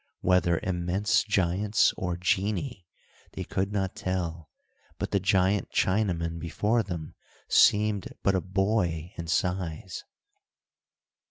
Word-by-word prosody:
Whether 90 -2 +3
immense 95 +4 +1
giants 100 +1 +2
or 90 -2 -3
genii, 100 - -1 0.5
they - - -4
could 95 +1 -2
not 95 -2 -2
tell, 85 -3 -3 0.5
but - - -4
the 100 - +2
giant 95 +1 +2
Chinaman 85 -5 0
before 105 +8 0
them 85 -6 -6 0.3
seemed 105 -2 +3
but 100 - +3
a 95 - +1
boy 95 -3 0
in 85 - -5
size. 90 0 -2
95 Hz, 110 wpm, -27 LUFS, 85-100 Hz, 0.5 s, Whether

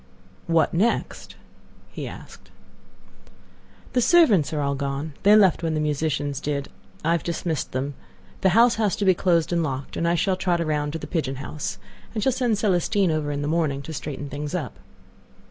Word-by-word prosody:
"What 165 -1 +2
next?" 210 +8 -1 0.6
he - - -6
asked. - - -12 1.4
"The 250 - +3
servants 235 - +5
are 155 - -2
all 140 -1 0
gone. 140 +2 -3
They 205 +2 +6
left 195 -6 +5
when 165 -1 -1
the - - 0
musicians 145 -1 -1
did. 140 -1 -3 0.4
I 165 - +3
have 170 -2 +2
dismissed 165 -2 -3
them. 135 +3 -2 0.5
The 190 - +4
house 235 0 +6
has 210 -4 +1
to 205 - -2
be 190 - +6
closed 170 -2 +1
and 170 - +2
locked, 135 -3 -4
and 170 - 0
I 170 - +2
shall 185 +2 +1
trot 180 -2 0
around 150 -2 -1
to - - -2
the - - -7
pigeon 150 -6 -2
house, 140 +2 -5 0.4
and 215 - -1
shall 265 - +3
send 245 -4 0
Celestine 195 -1 +2
over 155 -2 -1
in 145 0 -2
the - - -2
morning 150 -4 0
to 160 - -7
straighten 145 -1 -5
things 145 +1 -5
up." - - -4
160 Hz, 185 wpm, -24 LUFS, 145-190 Hz, 1.4 s, They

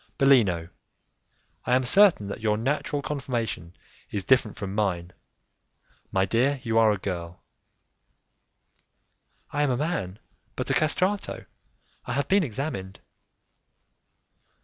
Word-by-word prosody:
"Bellino, 110 - +4 1.0
I 125 - +3
am 130 - +2
certain 180 - +5
that 100 - -5
your 105 -1 +1
natural 140 +4 -1
conformation 115 - -4 0.3
is 100 -3 -3
different 125 -4 +2
from 100 -1 -5
mine; 90 -4 -1 1.0
my 95 0 +2
dear, 130 +8 +1
you 115 -1 +2
are 110 -1 +5
a 105 - 0
girl." 90 -3 -6 2.1
"I 145 - -1
am 145 - +2
a 125 - +1
man, 135 - -2 0.4
but - - -2
a - - +3
castrato; 185 +6 0 0.6
I - - -2
have 140 +2 -1
been 200 +1 +4
examined." 110 - -4
115 Hz, 120 wpm, -26 LUFS, 95-140 Hz, 2.1 s, certain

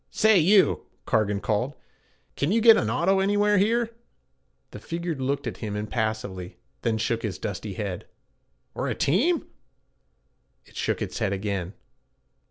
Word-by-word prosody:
'Say, 220 0 +4
you!' 190 +4 +4 0.2
Cargan 105 -3 +1
called, 115 +6 -1 0.6
'can 145 +5 0
you 225 - +3
get 225 0 +8
an 105 - 0
auto 175 +11 +2
anywhere 205 +1 +3
here?' 230 +3 +1 0.8
The - - -8
figure 170 0 -4
looked 140 0 -2
at - - -4
him 105 -2 -5
impassively, 105 -4 -3 0.2
then 115 -1 0
shook 115 +1 -1
its 105 -4 -3
dusty 100 0 -5
head. 100 -5 -4 0.7
'Or - - -3
a - - -1
team?' 270 - +2 1.2
It - - -21
shook - - -1
its - - -5
head 105 -3 0
again. 100 -1 -3
120 Hz, 145 wpm, -26 LUFS, -, 1.2 s, get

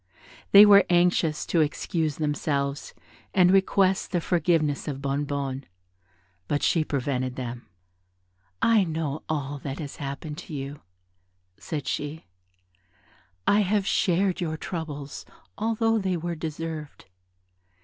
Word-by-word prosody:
They 200 +1 +10
were 200 -1 +8
anxious 175 -3 +2
to 165 - +2
excuse 155 0 -1
themselves, 145 -2 -2 0.4
and 180 -2 +6
request 195 0 +2
the 180 - +1
forgiveness 165 -4 +1
of 140 -3 -3
Bonnebonne; 140 -1 -2 0.8
but 145 - -1
she 165 - +3
prevented 130 -3 -2
them. 120 -2 -6 1.0
"I 225 -3 +5
know 155 -3 -3
all 145 -2 -2
that 135 +1 -5
has 145 -3 -7
happened 150 +2 -6
to 165 -3 -8
you," 140 +1 -6 0.8
said 150 -4 -4
she, 150 +2 -3 1.2
"I 205 - +4
have 205 0 +1
shared 190 -2 +1
your 160 -2 -2
troubles, 150 -5 -6 0.3
although 225 +1 +1
they 190 -3 -1
were 170 +1 -3
deserved. 160 -1 -6
155 Hz, 120 wpm, -26 LUFS, 145-180 Hz, 1.2 s, They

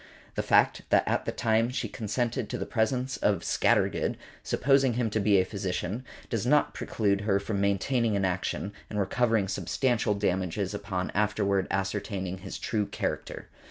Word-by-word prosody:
The - - -1
fact - - +3
that - - +3
at - - 0
the - - -1
time 115 +1 +2
she 125 - -2
consented 120 +1 -2
to - - -3
the - - -3
presence 125 +3 0
of 100 -4 +1
Scattergood, - - +2 0.2
supposing 135 -2 +3
him 115 -2 0
to 110 - +1
be 100 -1 +4
a 95 - +2
physician, 95 +3 -3 0.2
does 115 -4 -2
not 145 +4 +3
preclude 100 -3 0
her 100 -2 +2
from 100 0 -2
maintaining 105 +3 +1
an 100 -1 +1
action, 95 +2 -2 0.2
and 105 - -3
recovering 110 +1 +2
substantial 115 0 0
damages 95 0 -1
upon 100 -3 -3
afterward 100 -2 +1
ascertaining 95 -1 -2
his 95 0 -7
true 105 -3 -1
character. - - -4
105 Hz, 160 wpm, -28 LUFS, 95-115 Hz, 0.2 s, be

